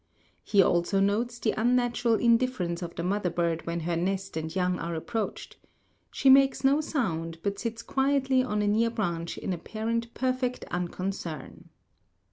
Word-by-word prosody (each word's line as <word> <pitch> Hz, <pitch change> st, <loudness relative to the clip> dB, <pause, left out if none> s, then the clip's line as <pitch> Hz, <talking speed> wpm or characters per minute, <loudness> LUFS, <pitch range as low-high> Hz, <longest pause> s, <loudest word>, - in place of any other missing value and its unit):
He 200 Hz, -2 st, +4 dB
also 175 Hz, +3 st, +2 dB
notes 220 Hz, +5 st, +1 dB
the 225 Hz, -2 st, 0 dB
unnatural 240 Hz, 0 st, +2 dB
indifference 230 Hz, -7 st, +1 dB
of 170 Hz, -1 st, -6 dB
the 170 Hz, -, -3 dB
mother 190 Hz, 0 st, 0 dB
bird 170 Hz, -1 st, -1 dB
when 170 Hz, 0 st, -2 dB
her 170 Hz, +1 st, -1 dB
nest 190 Hz, +2 st, -2 dB
and 160 Hz, 0 st, -3 dB
young 180 Hz, -1 st, 0 dB
are 170 Hz, 0 st, -3 dB
approached. 215 Hz, +7 st, -4 dB, 0.5 s
She -, -, -1 dB
makes 270 Hz, 0 st, +6 dB
no 275 Hz, +3 st, +4 dB
sound, 165 Hz, -, -2 dB
but 200 Hz, -1 st, -2 dB
sits 230 Hz, -1 st, -4 dB
quietly 270 Hz, -1 st, +2 dB
on 210 Hz, -5 st, -1 dB
a -, -, +1 dB
near 225 Hz, +3 st, +3 dB
branch 170 Hz, -7 st, -3 dB
in 190 Hz, -, -3 dB
apparent 230 Hz, +6 st, -3 dB
perfect 255 Hz, -1 st, -1 dB
unconcern. 180 Hz, -4 st, -5 dB
205 Hz, 155 wpm, -28 LUFS, 175-245 Hz, 0.5 s, makes